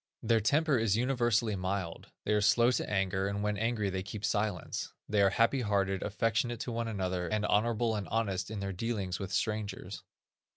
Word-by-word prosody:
Their 115 Hz, 0 st, +3 dB
temper 140 Hz, +4 st, +2 dB
is 110 Hz, -2 st, +2 dB
universally 120 Hz, -3 st, +1 dB
mild; 95 Hz, -2 st, -3 dB, 0.2 s
they -, -, +2 dB
are 105 Hz, -, +3 dB
slow 120 Hz, +4 st, +5 dB
to -, -, -1 dB
anger, 95 Hz, -1 st, 0 dB
and 100 Hz, +1 st, -2 dB
when 105 Hz, 0 st, 0 dB
angry 110 Hz, -2 st, 0 dB
they 95 Hz, 0 st, -2 dB
keep 100 Hz, +2 st, -5 dB
silence. 100 Hz, -2 st, -2 dB
They 105 Hz, -1 st, +2 dB
are 100 Hz, -, +6 dB
happy 115 Hz, +6 st, +2 dB
hearted, 100 Hz, -3 st, 0 dB
affectionate 115 Hz, +3 st, 0 dB
to 125 Hz, -, -3 dB
one 115 Hz, 0 st, -2 dB
another, 95 Hz, -4 st, -2 dB
and 105 Hz, +3 st, 0 dB
honorable 115 Hz, +1 st, +2 dB
and 105 Hz, -2 st, -3 dB
honest 100 Hz, -4 st, -1 dB
in 110 Hz, -2 st, -4 dB
their 100 Hz, 0 st, -3 dB
dealings 95 Hz, -3 st, -2 dB
with 95 Hz, -2 st, -5 dB
strangers. 100 Hz, -1 st, -2 dB
105 Hz, 190 wpm, -31 LUFS, 95-115 Hz, 0.2 s, are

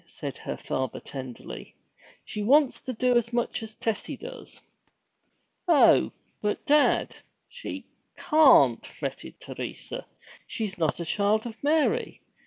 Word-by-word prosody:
said -, -, -6 dB
her -, -, -6 dB
father 130 Hz, -2 st, -3 dB
tenderly. 130 Hz, -3 st, -8 dB, 0.5 s
'She 210 Hz, -, -5 dB
wants 275 Hz, +5 st, +4 dB
to 260 Hz, -, -4 dB
do 250 Hz, +1 st, +1 dB
as 235 Hz, 0 st, +2 dB
much 240 Hz, -1 st, -1 dB
as 220 Hz, -1 st, -7 dB
Tessie 225 Hz, -2 st, -3 dB
does!' -, -, -8 dB, 1.1 s
'Oh, 325 Hz, -5 st, +6 dB, 0.3 s
but, 210 Hz, 0 st, -2 dB
dad, 295 Hz, 0 st, +3 dB, 0.3 s
she 485 Hz, -, -7 dB, 0.3 s
can't!' 260 Hz, -, +5 dB
fretted 65 Hz, -, -7 dB
Teresa. -, -, -6 dB, 0.4 s
'She's 200 Hz, -5 st, -4 dB
not 160 Hz, -1 st, 0 dB
a 170 Hz, -, -3 dB
Child 205 Hz, +5 st, +1 dB
of 230 Hz, 0 st, -8 dB
Mary! 320 Hz, +11 st, +1 dB
230 Hz, 125 wpm, -27 LUFS, 200-290 Hz, 1.1 s, Oh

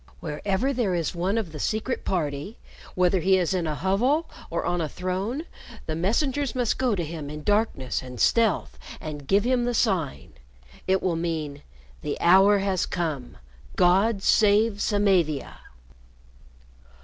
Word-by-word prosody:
Wherever 190 Hz, -, -1 dB
there 225 Hz, -8 st, 0 dB
is 170 Hz, 0 st, -1 dB
one 185 Hz, +5 st, -1 dB
of 205 Hz, -8 st, -2 dB
the 150 Hz, -, -8 dB
Secret 220 Hz, -, -2 dB
Party, 155 Hz, -, -2 dB, 0.4 s
whether 180 Hz, +1 st, +3 dB
he 190 Hz, +3 st, +3 dB
is 180 Hz, 0 st, 0 dB
in 175 Hz, -3 st, -1 dB
a 155 Hz, -, -2 dB
hovel 245 Hz, -, +1 dB, 0.2 s
or -, -, -2 dB
on 175 Hz, -1 st, 0 dB
a 155 Hz, -, -2 dB
throne, 190 Hz, -, -3 dB, 0.4 s
the 155 Hz, -, -3 dB
messengers 250 Hz, -, 0 dB
must 245 Hz, -3 st, 0 dB
go 250 Hz, -4 st, +2 dB
to 175 Hz, -, -2 dB
him 155 Hz, -2 st, -6 dB
in 150 Hz, 0 st, -7 dB
darkness 205 Hz, -, 0 dB
and 125 Hz, -1 st, -9 dB
stealth 225 Hz, -4 st, +2 dB, 0.2 s
and 145 Hz, -3 st, -7 dB
give 200 Hz, +5 st, +3 dB
him 245 Hz, 0 st, +1 dB
the 245 Hz, 0 st, -1 dB
sign. 160 Hz, -, -1 dB, 0.5 s
It 190 Hz, 0 st, +2 dB
will 180 Hz, -3 st, +1 dB
mean, 160 Hz, -4 st, -3 dB, 0.4 s
'The -, -, -4 dB
hour 195 Hz, +4 st, +6 dB
has 195 Hz, -2 st, 0 dB
come. 155 Hz, -8 st, -3 dB, 0.4 s
God 195 Hz, +3 st, +3 dB
save 210 Hz, 0 st, +3 dB
Samavia!'" 190 Hz, -9 st, +1 dB
190 Hz, 150 wpm, -25 LUFS, 160-215 Hz, 0.5 s, hour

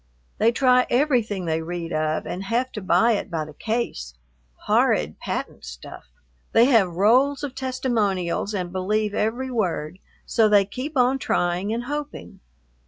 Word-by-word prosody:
They 225 Hz, +2 st, +4 dB
try 250 Hz, 0 st, +3 dB
everything 240 Hz, -8 st, +1 dB
they 160 Hz, -1 st, -1 dB
read 170 Hz, 0 st, -5 dB
of, 155 Hz, 0 st, -1 dB
and 185 Hz, +2 st, -5 dB
have 245 Hz, +5 st, -1 dB
to 210 Hz, -, -6 dB
buy 185 Hz, +5 st, +3 dB
it 210 Hz, -1 st, -1 dB
by 160 Hz, -3 st, -3 dB
the 155 Hz, -, -12 dB
case, 145 Hz, -, -3 dB, 0.5 s
horrid 75 Hz, +1 st, +2 dB
patent -, -, -5 dB
stuff! -, -, -10 dB, 0.5 s
They 230 Hz, -, +6 dB
have 215 Hz, -10 st, +3 dB
rolls 255 Hz, -, +3 dB
of 280 Hz, -3 st, -4 dB
testimonials 220 Hz, -8 st, -1 dB
and 180 Hz, -2 st, -3 dB
believe 210 Hz, +3 st, -1 dB
every 245 Hz, +6 st, -1 dB
word, 180 Hz, -6 st, -2 dB, 0.3 s
so 225 Hz, -2 st, +3 dB
they 205 Hz, -1 st, +5 dB
keep 265 Hz, +8 st, -6 dB
on 255 Hz, +2 st, +3 dB
trying 180 Hz, -2 st, 0 dB
and 235 Hz, +2 st, -2 dB
hoping. 290 Hz, -7 st, -6 dB
210 Hz, 155 wpm, -23 LUFS, 175-250 Hz, 0.5 s, They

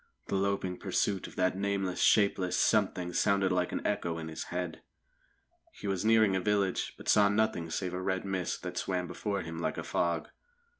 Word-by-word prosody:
The -, -, 0 dB
loping 95 Hz, -2 st, 0 dB
pursuit 100 Hz, -2 st, 0 dB
of -, -, -13 dB
that 90 Hz, 0 st, +1 dB
nameless, 100 Hz, -2 st, -1 dB
shapeless 95 Hz, -3 st, +3 dB
Something 95 Hz, -5 st, +2 dB
sounded 100 Hz, 0 st, +2 dB
like 90 Hz, -1 st, +1 dB
an -, -, -4 dB
echo 85 Hz, -5 st, -1 dB
in 80 Hz, -1 st, -5 dB
his 80 Hz, -, -5 dB
head. 90 Hz, -2 st, -4 dB, 0.9 s
He -, -, -11 dB
was 95 Hz, -2 st, -1 dB
nearing 110 Hz, -3 st, +4 dB
a 95 Hz, -, 0 dB
village, 100 Hz, -1 st, 0 dB
but -, -, -12 dB
saw 105 Hz, -1 st, +5 dB
nothing 105 Hz, -5 st, 0 dB
save 90 Hz, +2 st, -3 dB
a 90 Hz, -, -3 dB
red 95 Hz, 0 st, -1 dB
mist 95 Hz, -2 st, -2 dB
that -, -, -5 dB
swam 90 Hz, -1 st, -1 dB
before 100 Hz, +1 st, -3 dB
him 80 Hz, 0 st, -6 dB
like -, -, -2 dB
a -, -, -3 dB
fog. 85 Hz, -2 st, -1 dB
95 Hz, 190 wpm, -31 LUFS, 90-100 Hz, 0.9 s, saw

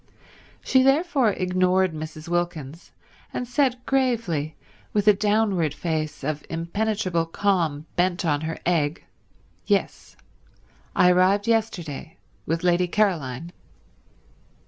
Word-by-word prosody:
She 260 Hz, -, +4 dB
therefore 270 Hz, -, +3 dB
ignored 185 Hz, 0 st, +1 dB
Mrs. 155 Hz, 0 st, -7 dB
Wilkins 170 Hz, -3 st, -3 dB, 0.4 s
and 250 Hz, -, -4 dB
said 250 Hz, 0 st, 0 dB
gravely, 230 Hz, -, 0 dB, 0.4 s
with 210 Hz, 0 st, +1 dB
a 210 Hz, -, +9 dB
downward 200 Hz, -7 st, +1 dB
face 155 Hz, -3 st, -3 dB
of 150 Hz, +1 st, -3 dB
impenetrable 170 Hz, 0 st, -1 dB
calm 165 Hz, -5 st, 0 dB
bent 180 Hz, 0 st, +1 dB
on 145 Hz, -2 st, +1 dB
her 160 Hz, 0 st, -4 dB
egg, 160 Hz, -3 st, 0 dB, 0.6 s
"Yes. -, -, -1 dB, 0.8 s
I 180 Hz, -, +6 dB
arrived 190 Hz, +3 st, +3 dB
yesterday 180 Hz, -10 st, -2 dB, 0.3 s
with 165 Hz, +1 st, -1 dB
Lady 180 Hz, 0 st, +3 dB
Caroline." 170 Hz, -, -1 dB
180 Hz, 105 wpm, -24 LUFS, 160-210 Hz, 0.8 s, a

